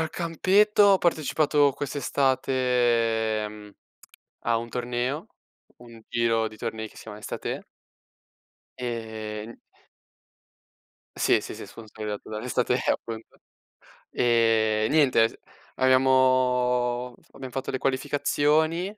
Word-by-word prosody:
Al 160 -1 -2
campetto 195 +5 +2
ho 195 -2 +5
partecipato 150 -3 +2
quest'estate, 125 -6 0
mhmm, 105 -1 -12 0.7
a 115 -1 +2
un 115 +1 -4
torneo, 125 - -3 0.5
un 115 -2 -14
giro 115 -1 +1
di 110 - -14
tornei 110 -1 -5
che - - -21
si - - -11
chiama 105 -1 -9
Estathè 105 - -5 1.2
Ehm 110 -2 -5 1.6
Sì, - - +3
sì, - - -8
sì, - - -9
sponsorizzato 110 -2 -8
dall' 110 +1 -5
Estathè 125 - +1
appunto. 115 -1 -5 0.7
E 115 -2 +2
niente, 135 -7 +4
t - - -16 0.4
abbiamo- 125 -1 +2 0.2
abbiam 130 - -9
fatto 135 +2 -4
le 130 - -2
qualificazioni, 145 +5 +1
125 Hz, 105 wpm, -26 LUFS, 115-135 Hz, 1.6 s, ho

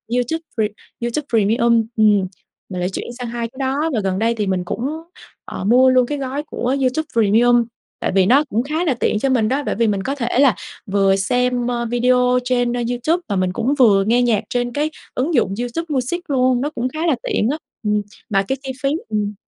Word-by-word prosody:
YouTube 250 +7 -1 0.2
Pre 220 - +2 0.4
YouTube 240 +5 -2
Premium, 230 +1 +3
ừm, 210 -2 +5 0.5
mình 185 -2 -5
lại 180 +1 -1
chuyển 190 - -5
sang 245 - -4
2 235 0 -3
cái 250 - -20
đó. 265 0 0 0.2
Và 225 - +1
gần 190 -1 -1
đây 230 +2 +2
thì 210 -3 -2
mình 185 -1 0
cũng, 240 +8 -3 0.6
ờ, - - -6
mua 250 +6 +5
luôn 255 -1 +4
cái 290 +4 -3
gói 275 +1 -3
của 260 -3 -2
YouTube 270 +4 0
Premium, 235 +2 +4 0.3
tại - - -1
vì 190 -1 +5
nó 265 +9 +5
cũng 225 +3 0
khá 310 +5 -2
là 290 - +2
tiện 225 -3 0
cho 270 - 0
mình 235 -5 +2
đó, 275 +4 0
bởi - - -1
vì 230 +1 +2
mình 200 -2 0
có 275 - -2
thể 245 -2 -1
là 270 -7 +5 0.3
vừa 195 -1 +2
xem, 245 +4 0
ơ, 240 -1 -1
video 250 +1 +2
trên, 245 -1 +1
ơ, 245 - -1
YouTube, 280 +9 0
và 200 - -1
mình 185 -1 0
cũng 255 +9 0
vừa 205 -6 +5
nghe 235 +4 +2
nhạc 235 -4 +2
trên 245 0 -1
cái 300 +2 0 0.3
ứng 285 +7 0
dụng 230 -8 +2
YouTube 245 +8 -3
Music 300 +6 -2
luôn, 255 -2 +2
nó 290 - -1
cũng 255 -4 -3
khá 310 +4 -7
là 310 - +3
tiện 215 - 0
á, 300 - -2 0.3
ừm. 210 -1 +1 0.3
Mà 195 -2 +2
cái 265 - -1
chi 265 - -4
phí 275 - +3 0.2
ừm. 210 -1 -1
245 Hz, 230 wpm, -19 LUFS, 215-260 Hz, 0.6 s, ừm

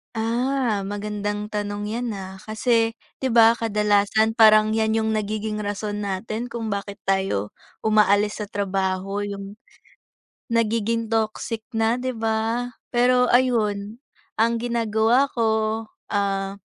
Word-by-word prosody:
Ah, 230 -2 0
magandang 205 0 -4
tanong 205 0 -3
'yan, 235 -2 -3
ah. 190 0 -8
Kasi, 225 +2 +1 0.2
'di 265 - -1
ba, 230 -1 +7
kadalasan 210 0 +2
parang 215 -1 +6
'yan 220 0 +1
'yong 220 0 +1
nagiging 215 0 -2
rason 205 0 -3
natin 215 +4 -3
kung 230 -2 -4
bakit 200 0 -4
tayo 190 - 0 0.3
umaalis 210 -1 +3
sa - - -7
trabaho. 195 0 -2
'Yong, 200 +1 -7 0.9
nagiging 230 0 +1
toxic 220 0 -2
na, 225 +1 +2
'di 255 0 -3
ba? 225 +2 -1 0.2
Pero, 250 +1 +4
ayun, 220 -4 +1 0.4
ang 230 +1 +2
ginagawa 235 +2 +2
ko, 220 -1 0 0.3
ah, 195 -1 -1
215 Hz, 120 wpm, -23 LUFS, 205-230 Hz, 0.9 s, ba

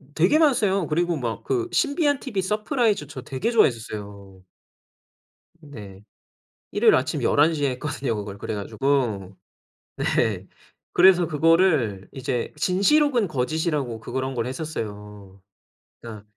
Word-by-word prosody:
되게 180 - +4
많았어요. 205 - +2
그리고 170 +2 0
막 120 -4 -4
그 365 -2 -1
신비한 290 -3 +1
TV 210 -8 -3
서프라이즈 210 - 0
저 130 -4 -8
되게 135 - -3
좋아했었어요. 105 - -1 1.2
네. 105 - -12 0.7
일요일 - - +4
아침 - - 0
11:00 150 0 +2
에 135 - +2
했거든요 135 -2 -3
그거 100 -1 -6
그래 110 - -4
가지고. 105 -4 -1 0.6
네. 100 -5 0 0.5
그래서 180 -2 +5
그거를 155 - +2
이제 130 -3 -3
진실 195 - +3
혹은 245 -8 +1
거짓이라고 145 -3 -2
그런 130 +4 -4
걸 115 -1 -2
했었어요. 105 -9 -7 0.6
그니까 110 -3 -9
140 Hz, 280 characters per minute, -23 LUFS, -, 1.2 s, 그래서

